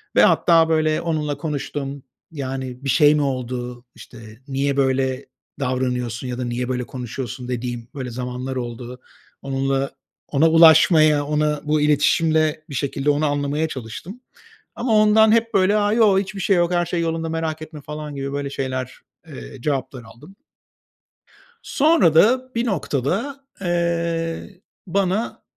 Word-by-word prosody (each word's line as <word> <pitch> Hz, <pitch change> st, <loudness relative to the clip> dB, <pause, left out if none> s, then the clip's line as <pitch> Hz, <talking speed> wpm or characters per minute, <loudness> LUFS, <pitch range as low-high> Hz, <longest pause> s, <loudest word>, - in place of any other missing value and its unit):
ve -, -, +6 dB
hatta, 165 Hz, -2 st, +4 dB
böyle, 155 Hz, -1 st, +1 dB
onunla 150 Hz, -4 st, -2 dB
konuştum. 145 Hz, -2 st, -4 dB, 0.3 s
"Yani, 130 Hz, -3 st, -5 dB
bir -, -, -1 dB
şey 145 Hz, +4 st, +5 dB
mi 150 Hz, -, +1 dB
oldu? 125 Hz, -2 st, -4 dB
İşte, 115 Hz, -2 st, -13 dB
niye 140 Hz, 0 st, -1 dB
böyle 130 Hz, -1 st, 0 dB, 0.3 s
davranıyorsun 125 Hz, -2 st, -2 dB
ya 125 Hz, -1 st, -4 dB
da -, -, -2 dB
niye 120 Hz, +1 st, -3 dB
böyle 125 Hz, -1 st, -1 dB
konuşuyorsun?" 125 Hz, +1 st, -6 dB
dediğim, 120 Hz, -1 st, -4 dB
böyle, 130 Hz, -3 st, -5 dB
zamanlar 125 Hz, +2 st, -5 dB
oldu. 120 Hz, +1 st, -6 dB, 0.4 s
Onunla 135 Hz, 0 st, -1 dB, 0.4 s
ona 150 Hz, +3 st, +3 dB
ulaşmaya, 160 Hz, -2 st, +6 dB
ona 150 Hz, 0 st, 0 dB
bu 150 Hz, 0 st, +1 dB
iletişimle 155 Hz, +1 st, +2 dB
bir 140 Hz, -, -6 dB
şekilde 140 Hz, +2 st, -1 dB
onu 145 Hz, +1 st, +2 dB
anlamaya 145 Hz, +2 st, 0 dB
çalıştım. 145 Hz, -, -8 dB, 0.5 s
Ama 235 Hz, -1 st, -1 dB
ondan 215 Hz, +1 st, +5 dB
hep, 230 Hz, 0 st, +2 dB
böyle: 195 Hz, +2 st, +4 dB
"A, 205 Hz, 0 st, +2 dB
yo. 215 Hz, -4 st, +4 dB
Hiçbir 195 Hz, +1 st, -5 dB
şey 195 Hz, +2 st, +2 dB
yok. 175 Hz, 0 st, +2 dB
her 175 Hz, 0 st, +2 dB
şey 170 Hz, 0 st, -1 dB
yolunda 165 Hz, 0 st, -2 dB
merak 160 Hz, -1 st, -3 dB
etme." 155 Hz, -1 st, -10 dB
falan 150 Hz, 0 st, -7 dB
gibi, 140 Hz, 0 st, -4 dB
böyle, 140 Hz, 0 st, -3 dB
şeyler, 130 Hz, -2 st, -4 dB, 0.3 s
eee, -, -, -9 dB
cevaplar 135 Hz, -3 st, -3 dB
aldım. 145 Hz, +12 st, -15 dB, 1.3 s
Sonra 300 Hz, -, +3 dB
da 255 Hz, +9 st, +3 dB
bir 235 Hz, +1 st, 0 dB
noktada, 200 Hz, -, -2 dB, 0.2 s
eee, 170 Hz, 0 st, -2 dB, 0.3 s
bana 195 Hz, +4 st, -1 dB
145 Hz, 145 wpm, -21 LUFS, 130-170 Hz, 1.3 s, ve